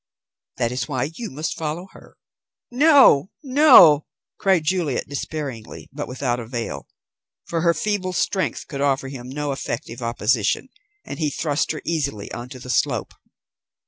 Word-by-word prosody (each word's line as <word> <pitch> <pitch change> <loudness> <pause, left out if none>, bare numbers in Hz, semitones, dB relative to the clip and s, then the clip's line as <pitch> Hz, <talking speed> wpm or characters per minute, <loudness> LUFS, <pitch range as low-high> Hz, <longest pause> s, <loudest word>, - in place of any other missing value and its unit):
That 120 -2 0
is 125 - -3
why 135 0 -2
you 230 +7 -6
must 150 +4 -4
follow 160 +3 -4
her." - - -17 0.5
"No, 265 - +6
no!" 255 - +7 0.3
cried 190 -5 +3
Juliet 160 -5 -1
despairingly, 140 -5 -6
but 145 +1 -5
without 125 -1 -2
avail, 115 0 -5 0.6
for 165 -1 -2
her 170 0 +3
feeble 205 0 -1
strength 185 +2 -1
could 140 -2 -5
offer 135 -1 0
him 125 -2 -8
no 145 +1 -3
effective 120 -3 -5
opposition, 115 - 0 0.4
and - - -7
he 155 -2 +1
thrust 145 0 -1
her 155 - -6
easily 140 -11 -2
on 120 +1 -7
to 130 - -9
the 125 0 -6
slope. - - 0
145 Hz, 145 wpm, -22 LUFS, 125-170 Hz, 0.6 s, no